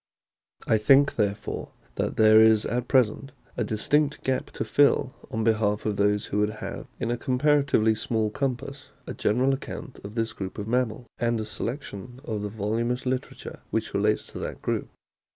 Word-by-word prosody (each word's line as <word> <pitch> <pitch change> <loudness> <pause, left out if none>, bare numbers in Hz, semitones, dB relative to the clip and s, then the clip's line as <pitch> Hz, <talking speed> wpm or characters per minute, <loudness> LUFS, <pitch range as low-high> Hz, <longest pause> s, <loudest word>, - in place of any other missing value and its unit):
I 110 - +3
think, 135 +6 +5
therefore, 100 -2 -2 0.2
that - - -2
there 110 0 +7
is 110 -1 +5
at 120 +1 -2
present 130 +1 +2 0.2
a - - 0
distinct 145 +7 +1
gap 130 -1 -1
to - - -3
fill 140 -2 +3 0.2
on 110 - -2
behalf 110 -2 +1
of 105 -1 0
those 105 0 +2
who 105 - -2
would 105 +1 +1
have 105 - -7
in 115 - -1
a 120 - -1
comparatively 130 -3 +2
small 110 0 -1
compass 135 +2 -3 0.2
a - - -5
general 125 +6 +2
account 135 - -6
of 100 +2 -8
this 115 -1 -1
group 95 -2 -6
of 105 0 -5
mammals, 120 0 0
and 120 -1 +1
a 110 - -3
selection 120 +1 -6
of 110 -2 -3
the 105 - -3
voluminous 115 +4 -2
literature 130 0 -4
which - - -2
relates - - +1
to - - -7
that - - -6
group. - - -1
115 Hz, 175 wpm, -26 LUFS, 105-130 Hz, 0.2 s, there